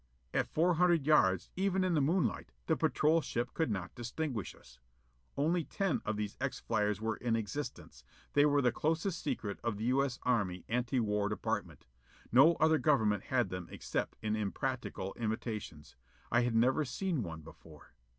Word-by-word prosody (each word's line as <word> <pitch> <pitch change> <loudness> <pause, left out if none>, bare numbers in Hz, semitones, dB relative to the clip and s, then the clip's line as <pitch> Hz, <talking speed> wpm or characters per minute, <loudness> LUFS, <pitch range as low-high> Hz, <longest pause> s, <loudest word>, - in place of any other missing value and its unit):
At - - +1
four 175 +3 +3
hundred 170 -3 +3
yards, 95 - +3
even 190 0 +1
in 185 -1 +1
the 155 - +3
moonlight, 165 - 0
the - - +2
patrol 160 +2 +2 0.3
could 160 - 0
not 95 -4 -3
distinguish 120 - -4
us. - - -19 0.6
Only 165 +4 +2
ten 195 +1 -1
of 110 0 -1
these 105 -1 -4
X - - -2
flyers 105 -1 0
were 110 0 -2
in 120 -2 0
existence: 115 - -5 0.3
they 145 - +5
were 145 -1 +3
the 125 - +4
closest 165 - -1
secret 115 -8 -3
of 115 -3 -1
the 110 - -5
U. 130 +3 +3
S. 130 -3 -3
Anti 120 +3 0
War 105 -1 0
Department. 105 - -3 0.5
No 140 +8 +7
other 160 0 +3
government 110 - +2
had 125 -2 +1
them 90 -1 -5
except - - -3
in 110 0 0
impractical 95 -1 -3
imitations. 105 - -4 0.4
I 120 - +4
had 120 -1 0
never 125 +6 +3
even 150 - -2
seen 170 +1 -1
one 80 -5 -6
before. 80 0 -15
120 Hz, 170 wpm, -33 LUFS, 105-155 Hz, 0.6 s, No